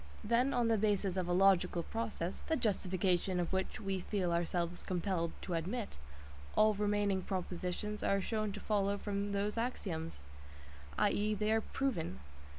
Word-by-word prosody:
Then, 240 +5 +3
on 245 -3 +2
the 225 -2 +3
basis 200 -3 +1
of 185 -2 -1
a - - 0
logical 180 -2 +4
process, 215 -6 -3
the 320 - +2
justification 185 - +1
of 175 +1 -1
which 190 +2 -1
we 195 -2 -1
feel 185 -1 -1
ourselves 170 +1 -1
compelled 180 -2 -1
to 180 - -3
admit, 185 - -3 0.6
all 215 0 +5
remaining 205 -1 +1
propositions 185 +3 -3
are 195 - +2
shown 215 +1 -1
to 210 - -5
follow 200 -1 +1
from 200 0 -2
those 205 +2 0
axioms, 175 - -3 0.8
i.e. 210 +1 +2
they 210 +1 +1
are 220 0 +3
proven. 220 - -2
200 Hz, 155 wpm, -35 LUFS, 180-215 Hz, 0.8 s, all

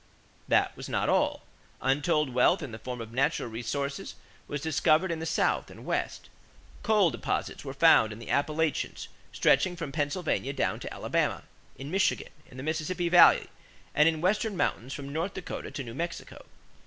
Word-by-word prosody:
That - - +2
was - - -8
not - - 0
all. - - +1 0.4
Untold 145 0 +1
wealth 140 +8 +3
in 140 - -6
the 110 - -8
form 125 +1 -6
of 115 0 -8
natural 135 +2 +1
resources 140 +5 -4 0.3
was 145 - -3
discovered 160 +3 +2
in 165 - -2
the 160 - -4
South - - +1
and - - -12
West. - - -2 0.5
Coal 205 -5 +3
deposits - - -3
were - - -5
found 110 0 +6
in 105 - -7
the 115 - -7
Appalachians 155 +1 -1 0.2
stretching 185 -2 +3
from 165 -5 -5
Pennsylvania 145 -1 -1
down - - -1
to - - -7
Alabama, - - -1 0.3
in 140 +3 -7
Michigan, 190 +1 +1 0.2
in 125 - -13
the 130 - -6
Mississippi 160 +3 -1
Valley, 175 0 +7 0.5
and 150 +2 +5
in 165 - -1
the 155 - -7
Western 205 +2 +1
mountains 130 -6 -1
from 140 0 -6
North 170 +5 -2
Dakota 190 - -6
to 140 - -5
New 115 -2 -8
Mexico. 170 +6 -6
150 Hz, 175 wpm, -28 LUFS, 135-170 Hz, 0.5 s, Valley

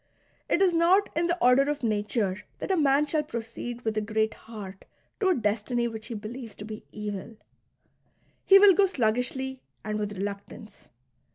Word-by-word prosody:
It 385 - +3
is 365 -2 +3
not 350 +5 +3
in 335 +2 +1
the 345 +1 0
order 270 0 +4
of 295 -2 -3
nature 210 -2 0 0.2
that - - -3
a - - +3
man 290 -2 +3
shall 300 +1 0
proceed 235 -2 -6
with 220 -1 -1
a - - +2
great 220 +1 0
heart 200 -4 -10 0.4
to 390 -4 +2
a 365 - +3
destiny 230 +1 0
which 220 -2 -7
he 235 - -5
believes 225 +2 -7
to 205 - -9
be 215 0 -8
evil; 210 +1 -6 1.1
he 390 - +8
will 395 -1 +8
go 390 +1 +4
sluggishly 260 - -1 0.2
and 215 0 -3
with 205 -1 -4
reluctance. 200 +2 -7
235 Hz, 175 wpm, -27 LUFS, 215-295 Hz, 1.1 s, he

